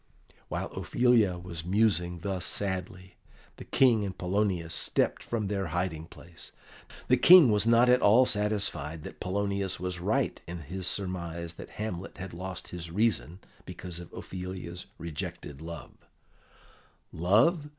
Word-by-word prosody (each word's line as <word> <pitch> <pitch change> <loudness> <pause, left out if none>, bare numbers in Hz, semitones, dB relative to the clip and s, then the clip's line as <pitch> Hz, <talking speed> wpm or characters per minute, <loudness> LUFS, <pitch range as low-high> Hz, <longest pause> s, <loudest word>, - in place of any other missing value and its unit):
While - - -4
Ophelia 120 -7 +2
was 85 -2 -7
musing 90 -3 +1
thus 95 -2 -3
sadly, 95 -1 -4 0.4
the - - -9
King 120 -5 +4
and 95 -2 -4
Polonius 90 -3 0
stepped - - +1
from 115 -3 -2
their 100 -2 -1
hiding 80 -1 -2
place. 85 -1 -10 0.5
The - - +5
King 175 -9 +9
was 105 +1 +2
not 115 +1 +6
at 125 +1 +5
all 115 +6 +6
satisfied 100 - -1
that - - -9
Polonius 100 0 -1
was 90 0 -3
right 85 - 0
in 85 0 -6
his 90 +5 -4
surmise 85 -4 -2
that - - -10
Hamlet 100 -4 -5
had 95 -1 -7
lost 95 +1 -6
his 85 -1 -6
reason 95 -2 0 0.2
because 90 -2 -7
of 85 - -10
Ophelia's 90 -1 -7
rejected 85 -3 -6
love. 85 -2 -8 1.2
"Love! 115 - +3
95 Hz, 140 wpm, -29 LUFS, 85-105 Hz, 1.2 s, King